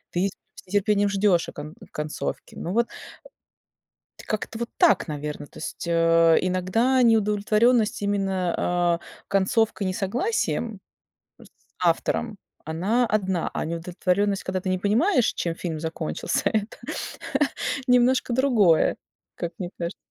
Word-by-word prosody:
ты 180 Hz, +3 st, +2 dB, 0.3 s
с -, -, -14 dB
нетерпением 205 Hz, +1 st, +2 dB
ждёшь 195 Hz, -4 st, +2 dB
кон 150 Hz, +1 st, -8 dB, 0.2 s
концовки. 150 Hz, 0 st, -4 dB
Ну 175 Hz, -, -4 dB
вот 235 Hz, +2 st, +2 dB, 1.4 s
как-то 215 Hz, +1 st, -3 dB
вот 235 Hz, 0 st, -3 dB
так, 350 Hz, -, +4 dB
наверно. 150 Hz, 0 st, -5 dB
То -, -, -15 dB
есть, 165 Hz, -, -6 dB
э, 165 Hz, -1 st, +5 dB
иногда 225 Hz, +9 st, +2 dB
неудовлетворенность 215 Hz, 0 st, +3 dB
именно, 195 Hz, -3 st, 0 dB
а, 175 Hz, -1 st, +1 dB, 0.3 s
концовкой, 200 Hz, +1 st, +1 dB
несогласием 225 Hz, -, -1 dB, 0.6 s
с -, -, -15 dB, 0.4 s
автором- 210 Hz, -, 0 dB, 0.3 s
она 195 Hz, +10 st, +1 dB
одна, 190 Hz, -5 st, 0 dB
а -, -, -2 dB
неудовлетворённость, 180 Hz, +4 st, -1 dB
когда 185 Hz, 0 st, -1 dB
ты 185 Hz, -, -4 dB
не 185 Hz, -, +1 dB
понимаешь, 235 Hz, -, +2 dB
чем 170 Hz, -1 st, -2 dB
фильм 165 Hz, -2 st, -4 dB
закончился, 160 Hz, -, -2 dB
это 215 Hz, 0 st, -2 dB, 1.1 s
немножко 250 Hz, 0 st, +3 dB
другое, 230 Hz, -, +4 dB, 0.4 s
как 170 Hz, 0 st, -4 dB
мне 180 Hz, -2 st, -4 dB
кажется. 170 Hz, 0 st, -4 dB
195 Hz, 120 wpm, -25 LUFS, 170-220 Hz, 1.4 s, э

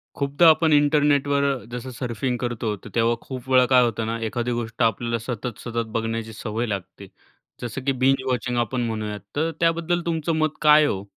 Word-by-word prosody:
खूपदा 140 Hz, +4 st, +3 dB
आपण 160 Hz, -1 st, +4 dB
इंटरनेटवर 145 Hz, -1 st, +3 dB, 0.3 s
जसं 125 Hz, +1 st, -6 dB
सर्फिंग 125 Hz, +1 st, -2 dB
करतो, 120 Hz, -3 st, -2 dB
तर -, -, -12 dB
तेव्हा 115 Hz, 0 st, +3 dB
खूप 130 Hz, -1 st, -8 dB
वेळा 130 Hz, -1 st, +5 dB
काय 125 Hz, 0 st, +5 dB
होतं 115 Hz, -1 st, -1 dB
ना, 115 Hz, +1 st, -2 dB
एखादी 120 Hz, +2 st, -2 dB
गोष्ट 120 Hz, 0 st, -4 dB
आपल्याला 115 Hz, +1 st, 0 dB
सतत, 120 Hz, 0 st, -5 dB
सतत 115 Hz, -1 st, -3 dB
बघण्याची 115 Hz, 0 st, -3 dB
सवय 110 Hz, +2 st, -3 dB
लागते. 100 Hz, -4 st, -6 dB, 0.5 s
जसं 125 Hz, +2 st, -5 dB
की 140 Hz, -, +3 dB
बिंज 135 Hz, 0 st, +3 dB
वॉचिंग 125 Hz, -1 st, -1 dB
आपण 120 Hz, +1 st, -1 dB
म्हणूयात, 110 Hz, -2 st, -4 dB, 0.2 s
तर 160 Hz, +3 st, 0 dB
त्याबद्दल 170 Hz, +1 st, +1 dB
तुमचं 165 Hz, -1 st, -1 dB
मत 155 Hz, 0 st, +2 dB
काय 150 Hz, 0 st, +7 dB
आहे 150 Hz, -, +3 dB
हो? 95 Hz, -7 st, -2 dB
125 Hz, 185 wpm, -23 LUFS, 115-145 Hz, 0.5 s, काय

